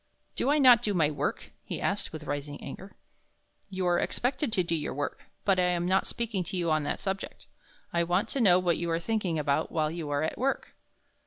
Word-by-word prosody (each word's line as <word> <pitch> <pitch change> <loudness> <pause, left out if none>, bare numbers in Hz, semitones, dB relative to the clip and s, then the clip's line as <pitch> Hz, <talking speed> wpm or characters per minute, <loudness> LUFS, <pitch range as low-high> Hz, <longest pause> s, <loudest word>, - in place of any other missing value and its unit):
"Do 265 - 0
I 295 - +4
not 255 -5 +7
do 205 -2 -1
my 155 -3 +3
work?" 145 - -3
he - - -5
asked, 200 - -1
with 155 -1 -7
rising 145 0 -4
anger. 190 +8 -9 0.7
"You 190 -1 -3
are 175 -1 +3
expected 255 +1 0
to 185 - +3
do 170 - -2
your 150 -4 -2
work, 145 0 -4 0.2
but 195 -2 +3
I 180 - +4
am 175 -1 +1
not 190 +1 +2
speaking 225 -5 -2
to 190 +2 -4
you 170 -2 0
on 155 0 +3
that - - -1
subject. 195 0 -4 0.5
I 170 - +2
want 180 +6 +1
to 275 - -1
know 180 -5 +6
what 180 -2 +1
you 170 0 -2
are 165 0 +1
thinking 190 -3 -1
about 150 +1 0
while 155 -2 0
you 165 -3 -5
are 145 +1 0
at 160 - -2
work." 270 +2 -1
175 Hz, 225 wpm, -29 LUFS, 160-200 Hz, 0.7 s, not